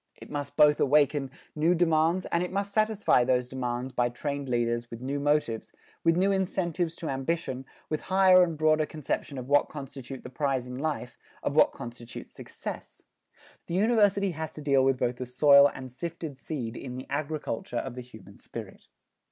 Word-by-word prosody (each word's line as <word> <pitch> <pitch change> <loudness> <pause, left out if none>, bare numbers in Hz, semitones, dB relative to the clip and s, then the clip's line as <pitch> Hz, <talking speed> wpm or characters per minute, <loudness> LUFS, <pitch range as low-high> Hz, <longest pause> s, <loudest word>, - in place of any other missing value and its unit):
It - - -13
must 145 -1 -5
both 150 -1 +6
awaken 145 -1 +3 0.3
new 160 +4 +3
demands 165 +1 +2
and 170 - +2
it 180 - -3
must 200 +1 -2
satisfy 215 - +3
those 125 0 +1
demands 125 0 -3
by 120 -1 +1
trained 140 +2 -4
leaders 120 -1 0
with 115 - -8
new 135 +3 -3
motives, 145 -6 0 0.3
with 165 0 +3
new 195 +2 +3
incentives 175 -3 -1
to 165 - -5
ambition, 135 -1 -2 0.2
with 155 - -2
higher 185 -1 +6
and 170 -3 +1
broader 155 0 +3
conception 145 -2 -4
of 125 -1 -6
what 145 +1 +3
constitute 135 -2 -8
the - - -8
prize 135 -1 -1
in 125 +1 -7
life, 145 -5 -3 0.2
of 140 - -1
what - - +6
constitutes 120 -2 -9
success. - - -8 0.6
The 170 - -3
University 205 -2 +3
has 160 -1 -5
to 150 - -7
deal 140 -2 +4
with 135 0 +3
both 120 0 -1
the 125 - -5
soil 140 +2 +6
and 130 -1 -9
sifted 160 0 -6
seed 125 -8 -5
in 125 0 -6
the 130 - -6
agriculture 145 -5 -3
of 130 - -3
the 125 - -6
human 110 -5 -14
spirit. - - -9
145 Hz, 180 wpm, -28 LUFS, 125-165 Hz, 0.6 s, both